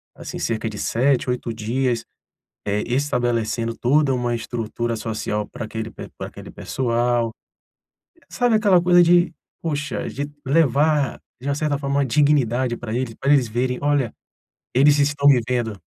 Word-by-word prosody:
assim -, -, -7 dB
cerca 110 Hz, 0 st, -1 dB
de 105 Hz, -, -8 dB
7, 130 Hz, +4 st, +1 dB
8 120 Hz, -2 st, -2 dB
dias, 115 Hz, +2 st, -1 dB, 0.6 s
eh, 105 Hz, +1 st, 0 dB
estabelecendo 120 Hz, -3 st, 0 dB
toda 140 Hz, +2 st, +3 dB
uma 120 Hz, -1 st, 0 dB
estrutura 115 Hz, 0 st, -3 dB
social 110 Hz, -1 st, -3 dB
pra 110 Hz, -, -6 dB
aquele 110 Hz, +1 st, -5 dB
pe -, -, -9 dB
pra -, -, -5 dB
aquele -, -, -11 dB
pessoal. 120 Hz, -2 st, 0 dB, 1.0 s
Sabe 245 Hz, -3 st, +2 dB
aquela 200 Hz, -5 st, +4 dB
coisa 175 Hz, 0 st, +5 dB
de, 175 Hz, 0 st, +4 dB, 0.3 s
poxa, 150 Hz, -2 st, -3 dB
de 145 Hz, +1 st, -4 dB, 0.2 s
levar 145 Hz, -1 st, +2 dB, 0.2 s
de 135 Hz, -, -6 dB
uma 140 Hz, -, +1 dB
certa 150 Hz, -1 st, 0 dB
forma, 140 Hz, 0 st, -2 dB
uma 140 Hz, -, +2 dB
dignidade 130 Hz, -3 st, +2 dB
pra 115 Hz, -2 st, -6 dB
eles, 120 Hz, -2 st, -2 dB
pra 140 Hz, +1 st, 0 dB
eles 130 Hz, -4 st, +3 dB
verem: 125 Hz, +3 st, -1 dB
"Olha, 145 Hz, -5 st, +1 dB, 0.6 s
eles 145 Hz, +3 st, +5 dB
estão 145 Hz, 0 st, +2 dB
me 135 Hz, -3 st, +7 dB
vendo"? 120 Hz, -5 st, -1 dB
125 Hz, 155 wpm, -22 LUFS, 115-145 Hz, 1.0 s, me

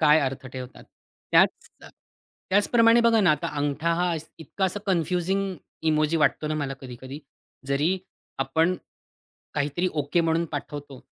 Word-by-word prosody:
काय 155 Hz, 0 st, +6 dB
अर्थ 135 Hz, -1 st, -3 dB
ठेवतात. 130 Hz, 0 st, -9 dB, 0.5 s
त्याच -, -, +4 dB
अ, -, -, -11 dB, 0.6 s
त्याचप्रमाणे 230 Hz, +4 st, +5 dB
बघा 230 Hz, -1 st, +4 dB
ना 185 Hz, -6 st, +5 dB
आता 150 Hz, -, 0 dB
अंगठा 145 Hz, +3 st, 0 dB
हा 175 Hz, 0 st, +1 dB, 0.2 s
इतका 160 Hz, +5 st, -3 dB
असा 190 Hz, +2 st, -1 dB
कन्फ्युजिंग 185 Hz, +2 st, 0 dB, 0.4 s
इमोजी 155 Hz, +1 st, +2 dB
वाटतो 155 Hz, 0 st, +2 dB
ना 155 Hz, -, -1 dB
मला 140 Hz, -3 st, -2 dB
कधी-कधी. 130 Hz, +2 st, -8 dB, 0.5 s
जरी 150 Hz, +7 st, +1 dB, 0.4 s
आपण 160 Hz, +7 st, +2 dB, 0.8 s
काहीतरी 145 Hz, +5 st, 0 dB
ओके 150 Hz, +2 st, +1 dB
म्हणून 165 Hz, 0 st, +1 dB
पाठवतो 145 Hz, -2 st, -6 dB
155 Hz, 135 wpm, -25 LUFS, 140-180 Hz, 0.8 s, काय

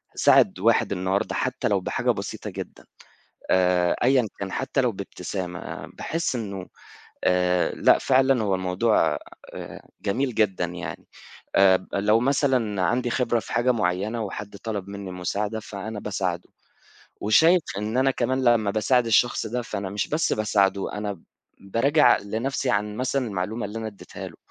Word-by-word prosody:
ساعد -, -, +4 dB
واحد 115 Hz, +1 st, +3 dB
النهارده، 95 Hz, +1 st, -1 dB
حتى -, -, -1 dB
لو -, -, +2 dB
بحاجة -, -, 0 dB
بسيطة -, -, -5 dB
جدًا -, -, -8 dB, 0.7 s
آآ 90 Hz, -1 st, +3 dB
أيًا 125 Hz, -2 st, +4 dB
كان، 95 Hz, -1 st, -4 dB
حتى 135 Hz, +1 st, -1 dB
لو 125 Hz, -2 st, +1 dB
بابتسامة، 90 Hz, -2 st, -6 dB
باحس 165 Hz, -4 st, -2 dB
إنه 100 Hz, -5 st, -5 dB, 0.6 s
آآ 90 Hz, 0 st, +2 dB
لأ -, -, +5 dB
فعلًا 130 Hz, -2 st, +3 dB
هو 100 Hz, -3 st, +1 dB
الموضوع 90 Hz, -3 st, +1 dB, 0.4 s
آآ -, -, -8 dB, 0.2 s
جميل 125 Hz, +5 st, -1 dB
جدًا 100 Hz, -5 st, +1 dB
يعني، 90 Hz, +1 st, -6 dB, 0.5 s
آآ 95 Hz, -1 st, +5 dB
لو 105 Hz, +3 st, +3 dB
مثلًا 125 Hz, -6 st, +1 dB
عندي 120 Hz, +7 st, +1 dB
خبرة 120 Hz, -1 st, +1 dB
في -, -, -9 dB
حاجة 120 Hz, +2 st, +3 dB
مُعيّنة 105 Hz, +2 st, -1 dB
وحد 105 Hz, 0 st, -6 dB
طلب 100 Hz, -2 st, -5 dB
مني 100 Hz, -1 st, -7 dB
مساعدة، 105 Hz, +4 st, -2 dB
فأنا 105 Hz, 0 st, -6 dB
باساعده، 90 Hz, -4 st, -3 dB, 0.7 s
وشايف 160 Hz, -, +5 dB, 0.2 s
إن 105 Hz, +3 st, -3 dB
أنا 135 Hz, +1 st, +4 dB
كمان 130 Hz, 0 st, 0 dB
لمّا 115 Hz, -4 st, +3 dB
باساعد 115 Hz, +4 st, +2 dB
الشخص 120 Hz, +2 st, +2 dB
ده، 120 Hz, +3 st, -2 dB
فأنا 100 Hz, -4 st, -5 dB
مش 100 Hz, 0 st, -2 dB
بس 155 Hz, +2 st, 0 dB
باساعده، 100 Hz, -2 st, +1 dB
أنا 105 Hz, 0 st, -3 dB
ب 95 Hz, -, -14 dB, 0.4 s
باراجع 115 Hz, +10 st, +4 dB
لنفْسِي 120 Hz, +6 st, -2 dB
عن 105 Hz, -1 st, -1 dB
مثلًا 130 Hz, +1 st, -1 dB
المعلومة 105 Hz, +2 st, -3 dB
اللي 105 Hz, +2 st, -6 dB
أنا 110 Hz, -, -4 dB
اديتها 100 Hz, -2 st, -9 dB
له، -, -, -16 dB
105 Hz, 150 wpm, -25 LUFS, 95-120 Hz, 0.7 s, لأ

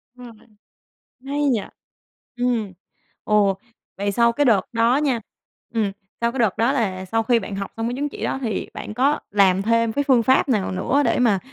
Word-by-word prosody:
Đúng 245 Hz, -2 st, -11 dB
rồi, -, -, -23 dB, 0.8 s
hay 285 Hz, +2 st, -2 dB
nhỉ? 235 Hz, -5 st, +1 dB, 0.7 s
Ừm, 240 Hz, -5 st, -1 dB, 0.5 s
ồ, 205 Hz, -2 st, +2 dB, 0.4 s
vậy 200 Hz, +1 st, -1 dB
sau 235 Hz, +2 st, +3 dB
cái 290 Hz, +5 st, +1 dB
đợt 225 Hz, -7 st, +4 dB
đó 230 Hz, +2 st, +3 dB
nha, 275 Hz, -5 st, +1 dB, 0.5 s
ừm, 210 Hz, -3 st, 0 dB, 0.3 s
sau 235 Hz, 0 st, +1 dB
cái 265 Hz, -, -6 dB
đợt 220 Hz, -5 st, +2 dB
đó 230 Hz, +4 st, +3 dB
là 190 Hz, -8 st, -1 dB
sau 225 Hz, +4 st, 0 dB
khi 235 Hz, +1 st, +3 dB
bạn 200 Hz, -2 st, -6 dB
học 200 Hz, 0 st, -5 dB
xong 225 Hz, +1 st, -2 dB
cái 240 Hz, -, -3 dB
chứng 290 Hz, +2 st, -2 dB
chỉ -, -, -7 dB
đó -, -, -1 dB
thì 220 Hz, -5 st, -3 dB
bạn 210 Hz, -, -7 dB
có 275 Hz, +5 st, +2 dB
làm 195 Hz, -2 st, +3 dB
thêm 230 Hz, +1 st, +2 dB
cái 285 Hz, +3 st, 0 dB
phương 255 Hz, -4 st, +4 dB
pháp 260 Hz, +4 st, +3 dB
nào 210 Hz, -7 st, +1 dB
nữa 250 Hz, +10 st, +1 dB
để -, -, +1 dB
mà 230 Hz, -6 st, +3 dB
230 Hz, 205 wpm, -22 LUFS, 205-250 Hz, 0.8 s, đợt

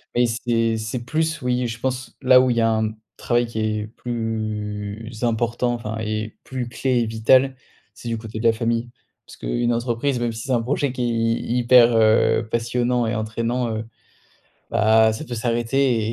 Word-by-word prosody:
Mais 120 Hz, 0 st, +4 dB
c'est 115 Hz, -1 st, 0 dB
c'est 110 Hz, +2 st, -4 dB
plus, 160 Hz, +4 st, -1 dB
oui, 125 Hz, 0 st, 0 dB
je 115 Hz, -1 st, -5 dB
pense 130 Hz, 0 st, -3 dB
là 130 Hz, -1 st, +7 dB
où 130 Hz, -, +2 dB
il 120 Hz, -, 0 dB
y -, -, +3 dB
a 115 Hz, -, +3 dB
un, 110 Hz, 0 st, +1 dB
mmh, 110 Hz, 0 st, -3 dB, 0.2 s
travail 120 Hz, 0 st, +1 dB
qui 115 Hz, -1 st, -5 dB
est 105 Hz, -1 st, -1 dB
plus 110 Hz, -2 st, -4 dB
important, 120 Hz, +1 st, 0 dB
enfin 110 Hz, -2 st, -5 dB
et 110 Hz, 0 st, -3 dB
plus 130 Hz, -2 st, -4 dB
clé 125 Hz, 0 st, 0 dB
et 115 Hz, -, +1 dB
vital, 130 Hz, +4 st, +3 dB, 0.4 s
c'est -, -, -10 dB
du 115 Hz, -, -1 dB
côté 110 Hz, 0 st, -7 dB
de 115 Hz, -, -4 dB
la 115 Hz, -, +5 dB
famille. 115 Hz, +1 st, -1 dB, 0.4 s
Parce -, -, -14 dB
qu'une 120 Hz, -, -1 dB
entreprise, 120 Hz, +3 st, -1 dB
même 120 Hz, -1 st, -1 dB
si 110 Hz, 0 st, -6 dB
c'est 135 Hz, -, -4 dB
un 120 Hz, -2 st, +2 dB
projet 135 Hz, +3 st, -1 dB
qui 125 Hz, 0 st, -5 dB
est -, -, +1 dB
hy 115 Hz, +1 st, 0 dB
hyper, 120 Hz, -1 st, +6 dB
heu, 110 Hz, 0 st, +3 dB
passionnant 120 Hz, +1 st, 0 dB
et 110 Hz, -, -1 dB
entraînant, 115 Hz, +2 st, -2 dB
heu, 110 Hz, +1 st, -4 dB, 0.9 s
bah 110 Hz, +1 st, +4 dB
ça 110 Hz, -, -6 dB
peut 120 Hz, -, -5 dB
s'arrêter 120 Hz, +2 st, +1 dB
115 Hz, 195 wpm, -22 LUFS, 110-125 Hz, 0.9 s, là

